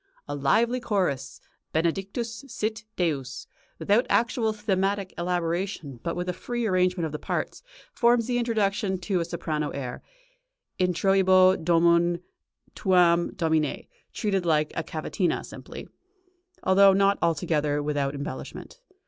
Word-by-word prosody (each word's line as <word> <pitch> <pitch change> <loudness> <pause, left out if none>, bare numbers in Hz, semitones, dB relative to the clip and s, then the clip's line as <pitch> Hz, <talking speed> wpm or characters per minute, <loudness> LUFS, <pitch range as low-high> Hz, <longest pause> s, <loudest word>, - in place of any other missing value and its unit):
A 145 - -4
lively 225 - +2
chorus 185 - -1 0.3
Benedictus 195 - -2
sit 220 -3 -3
Deus, 140 -7 -2 0.3
without 215 +5 +2
actual 230 -1 +2
thematic 200 -2 -1
elaboration 170 - -2
but 170 - -3
with 180 0 -3
a 180 - -1
free 240 +5 -3
arrangement 185 -3 +1
of 155 - -4
the 150 - -5
parts, - - -3 0.3
forms 235 - +3
the 245 0 0
introduction 205 -4 0
to 185 0 0
a 170 - -1
soprano 155 -3 -3
air, 130 -3 -5 0.8
Introibo 185 +1 +4
domum 170 +1 +3 0.5
tuam 175 -3 +3
domine 160 -4 0 0.3
treated 195 -4 -1
like 155 -3 +1
a 165 - -1
cavatina, 165 +4 -2
simply, - - -10 0.8
although 195 +1 +6
not 195 +1 +3
altogether 150 -3 0
with 150 0 -2
out 140 0 -1
embellishment. 150 - -7
180 Hz, 125 wpm, -26 LUFS, 160-200 Hz, 0.8 s, although